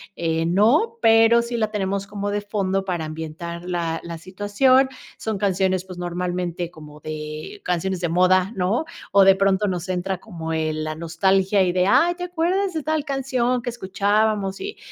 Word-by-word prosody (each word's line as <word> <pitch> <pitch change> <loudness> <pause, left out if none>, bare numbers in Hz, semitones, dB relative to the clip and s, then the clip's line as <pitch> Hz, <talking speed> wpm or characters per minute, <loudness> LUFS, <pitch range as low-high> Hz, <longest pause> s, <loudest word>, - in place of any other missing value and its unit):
eh, 165 -1 -1
no, 230 - +3
pero 225 +1 +6
sí 235 0 -4
la 215 -2 0
tenemos 200 -1 -2
como 205 0 -4
de 205 - -1
fondo 195 -2 -1
para 175 -4 -2
ambientar 160 +2 -6
la 170 -2 -2
la 170 -1 -6
situación. 205 +9 +2 0.3
Son 220 -2 -3
canciones, 190 -2 +1
pues, 185 -1 -10
normalmente 175 -1 -3
como 150 -3 -13
de 155 0 -7
canciones 180 +1 -1
de 175 - 0
moda, 185 +3 +3
¿no? 195 - 0 0.3
O 200 0 +6
de 195 0 +7
pronto 195 +1 +2
nos 180 -1 -3
entra 185 0 -2
como 165 -6 -7
el 155 -1 -1
la 155 0 -3
nostalgia 190 +5 +2
y 180 - +1
de: 180 0 +2
"Ay, 345 +10 +4
¿te 355 - -6
acuerdas 360 +3 0
de 315 - -2
tal 310 0 -1
canción 255 -3 0
que 240 - -3
escuchábamos?", 205 -2 0
y 405 +1 -6
190 Hz, 175 wpm, -22 LUFS, 175-220 Hz, 0.3 s, de